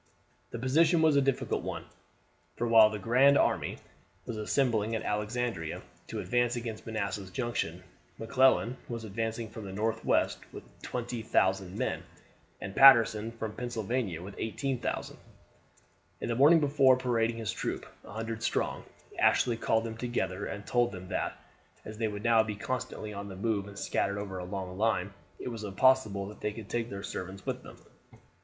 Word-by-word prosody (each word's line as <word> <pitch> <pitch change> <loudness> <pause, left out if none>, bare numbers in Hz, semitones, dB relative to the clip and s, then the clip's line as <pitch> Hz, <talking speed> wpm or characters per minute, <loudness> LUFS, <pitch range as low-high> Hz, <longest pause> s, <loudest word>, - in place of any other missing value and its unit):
The - - -6
position 160 +7 +3
was 155 -2 +5
a 140 - +5
difficult 135 -1 0
one, - - -5 0.7
for 120 - -1
while 110 -2 +8
"the 110 - -4
grand 125 +7 +5
army" - - +1 0.5
was 120 - -4
assembling 110 -1 +1
at 110 - -3
Alexandria 105 -4 -2 0.2
to - - -5
advance 120 0 +1
against 115 -2 -5
Manassas 100 -3 -3
Junction, 90 -5 -3 0.3
McClellan 130 +1 +3
was 115 -1 -4
advancing 110 +2 -3
from 110 0 -9
the 95 - -7
northwest 110 - 0
with - - -9 0.2
20,000 105 -6 -1
men, - - -1 0.6
and 95 - -7
Patterson 115 -4 +7
from 110 -2 -5
Pennsylvania 115 -7 -3
with 100 +1 -8
18,000. 130 +3 -3 1.0
In - - -4
the 115 - 0
morning 150 +7 +7
before 140 -3 +4
parading 115 -2 0
his 110 -3 -2
troop, - - -3 0.2
100 115 +3 -5
strong, - - -1 0.3
Ashley 120 -2 +4
called 115 0 +1
them 110 -1 -5
together 105 -6 -2
and 100 0 -6
told 120 -1 +2
them 95 -1 -9
that, - - -2 0.5
as 110 0 -8
they 110 - +1
would 105 0 -5
now 115 -1 +5
be 110 -1 -3
constantly 125 -2 -4
on 100 0 -6
the 95 - -7
move 100 0 -1
and 100 0 -11
scattered 100 0 -1
over 95 -2 -5
a 90 - -5
long 95 0 -5
line, 105 -3 +1 0.2
it - - -5
was 115 -3 -6
impossible 105 -1 +3
that 105 - -12
they 105 - -1
could 110 -2 -9
take 120 -1 -2
their 100 0 -6
servants 95 -1 -6
with - - -3
them. - - -12
110 Hz, 165 wpm, -30 LUFS, 100-120 Hz, 1.0 s, while